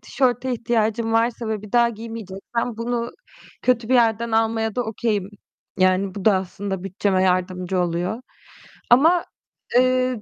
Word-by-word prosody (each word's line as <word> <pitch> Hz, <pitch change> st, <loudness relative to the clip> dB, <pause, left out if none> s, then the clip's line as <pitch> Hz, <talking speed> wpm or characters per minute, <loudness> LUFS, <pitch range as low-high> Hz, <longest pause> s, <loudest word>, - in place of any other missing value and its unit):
tişörte 255 Hz, -1 st, 0 dB
ihtiyacım 225 Hz, -1 st, 0 dB
varsa 230 Hz, 0 st, +1 dB
ve 215 Hz, -2 st, -3 dB
bir 210 Hz, -, -11 dB
daha 240 Hz, -1 st, +5 dB
giymeyeceksem 225 Hz, 0 st, -5 dB
bunu 235 Hz, +1 st, -2 dB, 0.5 s
kötü 240 Hz, -3 st, +1 dB
bir 260 Hz, -, +3 dB
yerden 230 Hz, -1 st, +2 dB
almaya 220 Hz, -1 st, +1 dB
da 245 Hz, -, +1 dB
okay'im. 215 Hz, -3 st, -2 dB, 0.5 s
Yani 185 Hz, +1 st, +2 dB
bu 200 Hz, -, -6 dB
da 215 Hz, -, +5 dB
aslında 190 Hz, 0 st, -4 dB
bütçeme 190 Hz, 0 st, 0 dB
yardımcı 185 Hz, 0 st, 0 dB
oluyor. 180 Hz, +7 st, -2 dB, 0.7 s
Ama, 320 Hz, +8 st, +5 dB, 0.5 s
eee, 255 Hz, -2 st, +2 dB
225 Hz, 135 wpm, -22 LUFS, 195-240 Hz, 0.7 s, daha